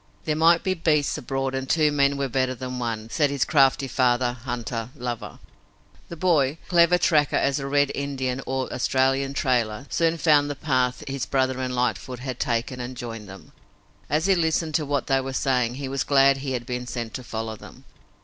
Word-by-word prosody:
There 155 - 0
might 165 +2 +4
be 190 - +1
beasts 155 -4 +1
abroad 135 +1 -2
and 135 0 -4
two 155 -2 +3
men 140 -1 +2
were 140 -1 -1
better 130 0 0
than 125 0 -5
one, 115 -2 -4
said 145 -3 +2
this 140 -2 0
crafty 135 -2 +3
father 125 -1 +1
hunter 120 -2 -5
lover. 120 -2 -5 0.7
The 170 - -6
boy, 155 -4 +2
clever 175 0 +5
tracker 150 -6 +2
as 140 0 +1
a 135 - -4
red 145 0 +2
Indian 135 -2 -3
or 130 -1 -2
Australian 135 +2 +1
trailer, 125 -3 0
soon 165 0 +1
found 145 -2 +3
the 145 - -3
path 130 -2 0
his 135 -1 -3
brother 130 -1 0
and 130 -1 -2
Lightfoot 125 +1 -1
had 125 0 -6
taken 120 +2 -1
and 125 +1 -6
joined 115 -4 -7
them. 95 0 -12 0.6
As 155 +3 +1
he 195 - +4
listened 160 -2 0
to 150 -1 0
what 145 -1 -1
they 135 -1 +2
were 135 0 -5
saying 125 -3 0
he 135 0 -5
was 135 0 -1
glad 135 -1 +4
he 135 -1 -4
had 120 -2 -3
been 125 0 -4
sent 120 -3 -5
to 130 - -6
follow 110 -1 -5
them. 105 - -14
135 Hz, 195 wpm, -24 LUFS, 125-145 Hz, 0.7 s, clever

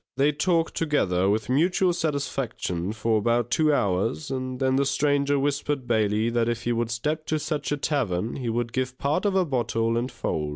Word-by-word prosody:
They 140 +2 +4
talked 165 +2 +1
together 95 - +1
with 110 +1 0
mutual 175 +7 +2
satisfaction 135 - -2
for 110 0 +1
about 120 +2 +1
two 155 -1 +3
hours, 115 +4 0
and 130 -1 -3
then 130 -1 +2
the 140 - +3
Stranger 140 +1 +1
whispered 140 -1 -1
Bailey 110 0 +1
that 120 0 +1
if 120 0 -2
he 120 - 0
would 115 -1 0
step 150 +7 -2
to 155 - +1
such 150 0 -3
a 145 - +1
tavern, 115 - -1
he 125 -4 -3
would 120 +1 -2
give 130 0 -2
part 150 +9 0
of 200 -2 +1
a 190 -1 +3
bottle 115 -4 0
and 120 +2 -2
fowl. 80 -10 -2
130 Hz, 195 wpm, -25 LUFS, 115-145 Hz, -, They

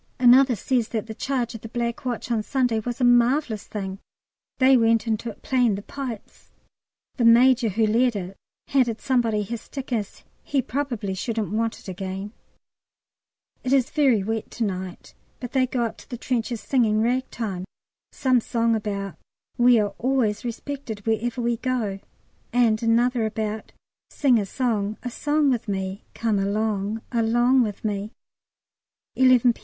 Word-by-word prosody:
Another 255 +1 +6
says 235 +2 0
that 220 -3 -3
the 220 - -7
charge 245 0 -2
of 225 - -8
the 225 - -8
Black 235 +1 -3
Watch 245 0 -3
on 225 -2 +1
Sunday 245 -1 0
was 240 +3 -4
a - - 0
marvellous 245 -1 +3
thing. 195 -2 -5 0.6
They 260 0 +6
went 230 -2 +3
into 225 +1 -1
it 215 - -12
playing 245 -5 +2
the 200 - -7
pipes! 250 -5 -8 0.7
The 245 - +1
Major 240 +1 +6
who 220 +3 +1
led 235 +2 +2
it 190 -1 -5 0.3
handed 245 -5 +2
somebody 230 -5 +1
his 230 +2 -5
stick, 270 -2 -7
as 210 -4 -3 0.2
he 280 - -1
"probably 245 -7 -3
shouldn't 215 0 -3
want 225 +1 -1
it - - -15
again." 190 +2 -5 1.3
It 255 - -2
is 265 -3 +2
very 265 -9 +3
wet 220 +1 -3
to 235 - -3
night, 185 -3 -5 0.3
but 245 - -6
they 260 -2 +2
go 245 -1 -1
up 230 - -3
to - - -16
the 245 - -5
trenches 235 -2 -2
singing 220 -5 +2
Ragtime, 230 -6 -2 0.5
some 255 -2 +2
song 230 0 +1
about 200 -5 -4 0.4
"We 240 0 +6
are 205 -1 -1
always 245 -5 +1
respected 240 -3 -6
wherever 230 +2 -1
we 235 0 +1
go." 225 -6 -2 0.5
And 230 -3 +3
another 235 +1 +2
about 215 0 -4 0.4
"Sing 255 -5 +3
a 200 - -3
song 215 -3 -1
a 245 - -4
song 295 +2 +1
with 240 -3 -2
me. 190 0 -3
Come 220 -3 0
along 210 +1 -1
along 240 +2 +3
with 210 -2 -3
me." 205 0 -2 1.0
11 255 -2 +5
P. - - -20
230 Hz, 160 wpm, -24 LUFS, 210-250 Hz, 1.3 s, Another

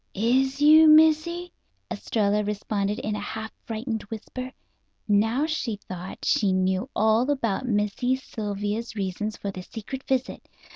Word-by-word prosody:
"Is 260 +6 +1
you, 315 +1 +8
Missy?" 320 +3 +4 0.4
Estralla 210 -1 0
responded 205 0 -2
in 215 0 -3
a - - -3
half 220 +1 -5
frightened 225 0 -3
whisper. 255 +3 -6 0.6
Now, 225 +7 +2
she 310 -8 -2
thought, 185 -2 -8
she 195 -3 +2
knew 185 +5 0
all 220 +4 +3
about 255 -3 -1
Missy 210 +3 +1
Sylvia's 210 -2 -4
reasons 205 +2 -3
for 200 - -4
the 185 - -7
secret 230 +7 -7
visit. 265 -1 -2
220 Hz, 135 wpm, -25 LUFS, 205-265 Hz, 0.6 s, you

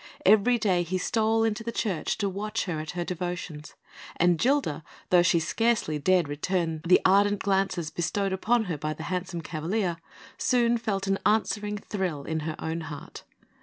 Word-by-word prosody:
Every 215 +5 +5
day 190 -6 +2
he 175 +2 -2
stole 225 +3 +1
into 225 0 -1
the 235 - -3
church 200 -8 -1
to 205 - 0
watch 205 +3 -2
her 170 -5 -3
at 155 +2 -5
her 175 - 0
devotions; 175 -4 -5 0.4
and 175 -1 +3
Gilda, 240 - +1 0.3
though 180 -1 +7
she 175 -1 +3
scarcely 190 -3 0
dared 180 +1 +3
return 165 +2 -1
the 180 - +6
ardent 205 +2 +4
glances 190 -5 0
bestowed 190 +4 -1
upon 225 +5 +2
her 170 -7 -4
by 155 +1 -3
the - - -7
handsome 180 -1 -3
cavalier, 170 +3 -2 0.4
soon 240 -1 +2
felt 205 -4 -2
an 195 0 0
answering 210 -1 +1
thrill 185 -8 -3
in 160 +2 -2
her 155 0 -4
own 160 +1 -3
heart. 150 -2 -9
185 Hz, 170 wpm, -27 LUFS, 165-210 Hz, 0.4 s, though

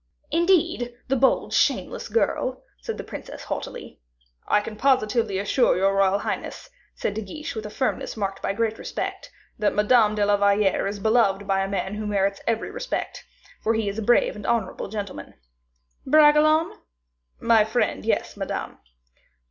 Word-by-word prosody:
"Indeed! 335 -8 +1
the 270 - +3
bold, 265 +1 +2
shameless - - +1
girl," 260 - 0 0.2
said - - -5
the - - -5
princess, - - -9
haughtily. - - -6 0.5
"I 210 - +4
can 215 +1 -7
positively 225 -4 +1
assure 205 +5 +2
your 195 +1 +2
royal 195 0 +3
highness," 205 - -5 0.2
said - - -2
De 220 - -4
Guiche, 300 +10 -7
with 215 -1 -5
a - - -8
firmness 255 0 -2
marked 195 -2 -3
by - - -1
great 225 +1 -1
respect, - - -5 0.3
"that 210 - +1
Mademoiselle 215 0 +4
de 205 -1 +2
la 205 0 +3
Valliere 200 -1 +2
is 200 +1 -3
beloved 200 -2 +2
by 195 0 +1
a 195 - -2
man 195 0 -2
who 210 0 -4
merits 200 -1 0
every 230 -1 -1
respect, - - -4 0.4
for 225 +1 +1
he 220 -2 -1
is 200 +2 -3
a - - -2
brave 240 +3 +3
and 210 - -7
honorable 230 -5 -1
gentleman." 200 -1 -6 0.7
"Bragelonne?" 310 +1 +4 0.6
"My 230 -2 +4
friend; 220 - -1
yes, - - -1
Madame." - - -5
215 Hz, 165 wpm, -24 LUFS, 200-245 Hz, 0.7 s, I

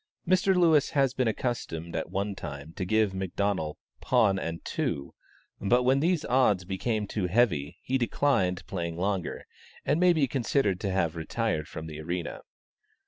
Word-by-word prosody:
Mr. 185 +1 +3
Lewis 160 -5 +4
had 135 -4 +1
been 130 -2 +1
accustomed 95 -8 -3
at - - -2
one 100 +2 -2
time 75 -3 -7
to 95 - -3
give 110 +1 +2
McDonnel 95 -4 -1 0.2
pawn 95 -1 +3
and 85 -2 -5
two; 70 -1 -2 0.5
but, 120 +5 +3
when 130 +2 +4
these 165 +1 +1
odds 110 -8 +3
became 105 +3 -1
too 100 -2 -2
heavy, 90 -8 +1
he 130 +1 0
declined 95 -7 +1
playing 85 -3 -4
longer, 95 0 -2 0.4
and 150 - +2
may 180 0 +6
be 155 -5 +3
considered 120 -6 +1
to 100 - -2
have 85 -3 0
retired 80 -1 -2
from 80 - -7
the 80 -1 -7
arena. 85 +2 -4
100 Hz, 160 wpm, -28 LUFS, 85-130 Hz, 0.5 s, may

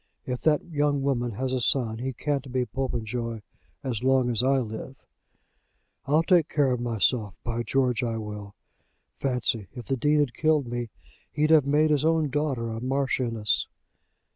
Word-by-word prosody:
If 125 -1 -3
that 150 -2 +2
young 145 -4 0
woman 120 -4 0
has 130 +5 -2
a 130 - +1
son 115 -3 +1
he 130 +2 -2
can't 140 0 -3
be 130 -1 0
Popenjoy 120 -3 -3 0.4
as 125 -3 -2
long 130 -2 +3
as 115 -1 +1
I 135 +2 +3
live. 120 +2 -4 1.1
I'll 155 +4 +4
take 170 -3 +3
care 140 -3 +2
of 125 - 0
myself. 115 -3 +1
By 120 0 -2
George 125 -1 +1
I 115 -2 -1
will. 105 -2 -7 0.6
Fancy, 125 -6 0
if 120 -3 -7
the 135 - 0
Dean 150 +4 +2
had 140 -5 +1
killed 155 -3 +2
me. 120 -1 -4 0.4
He'd 155 +1 +1
have 150 -4 +6
made 150 +2 +3
his 145 -1 +2
own 160 -2 +2
daughter 135 -6 -1
a 110 0 -5
Marchioness." 125 -5 0
130 Hz, 165 wpm, -26 LUFS, 115-145 Hz, 1.1 s, have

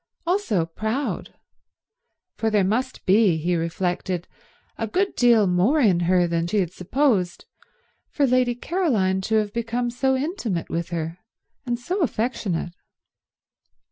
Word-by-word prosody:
Also 335 - +1
proud; 220 - -3 1.0
for 225 - 0
there 210 -2 +3
must 245 +7 -1
be, 195 -3 +4
he 175 +3 0
reflected, 175 +1 -2 0.5
a 225 - -3
good 390 - 0
deal 235 -4 +5
more 190 - +2
in 200 -10 +4
her 175 +1 +3
than 170 0 -1
he 210 - -1
had 180 -3 0
supposed, 190 -3 0 0.6
for 285 - +1
Lady 250 -1 +2
Caroline 235 - 0
to 220 +3 -1
have 210 -1 +1
become 235 +1 -2
so 265 +2 +1
intimate 260 - -3
with 170 +1 -2
her 165 0 -4 0.5
and 240 0 0
so 360 +11 -3
affectionate. 215 - -1
215 Hz, 135 wpm, -23 LUFS, 180-250 Hz, 1.0 s, deal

